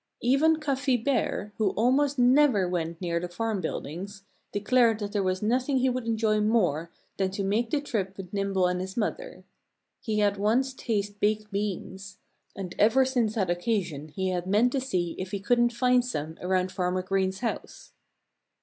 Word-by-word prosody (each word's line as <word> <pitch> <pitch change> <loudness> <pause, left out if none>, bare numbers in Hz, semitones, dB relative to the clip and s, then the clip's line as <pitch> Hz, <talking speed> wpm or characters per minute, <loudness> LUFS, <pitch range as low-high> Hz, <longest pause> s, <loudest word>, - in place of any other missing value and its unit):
Even 275 +6 +4
Cuffy 275 -3 +1
Bear, 225 -4 -1
who 215 -3 +3
almost 270 +5 +2
never 250 -5 +4
went 170 -2 -3
near 170 -2 -1
the 175 +1 -5
farm 210 +2 -2
buildings, 185 +5 -5 0.3
declared 225 +2 +3
that 205 -2 -5
there 205 -1 0
was 185 +1 -1
nothing 255 +5 +1
he 260 0 +2
would 250 -2 -4
enjoy 220 -1 +1
more 180 -8 +1 0.3
than 190 -1 +1
to 195 +1 -3
make 215 +4 0
the 295 - +1
trip 200 -9 -3
with 190 -1 -9
Nimble 195 -2 +1
and 180 0 0
his 190 +3 -6
mother. 370 - -3 0.6
He 215 -3 -2
had 205 -1 +2
once 240 +6 +1
tasted 205 -5 -3
baked 215 0 0
beans. 195 -1 -4 0.4
And 185 -3 -6
ever 240 +5 +5
since 245 -5 0
that 190 -5 +1
occasion 175 -5 -2
he 190 +4 -3
had 180 -1 -2
meant 215 +6 +3
to 270 - -1
see 180 -10 -1
if 185 0 -4
he 200 0 -3
couldn't 240 +4 +2
find 250 +1 +3
some 160 -10 -4
around 185 0 0
Farmer 185 0 -1
Green's 190 +1 -1
house. - - -5
205 Hz, 175 wpm, -27 LUFS, 185-245 Hz, 0.6 s, ever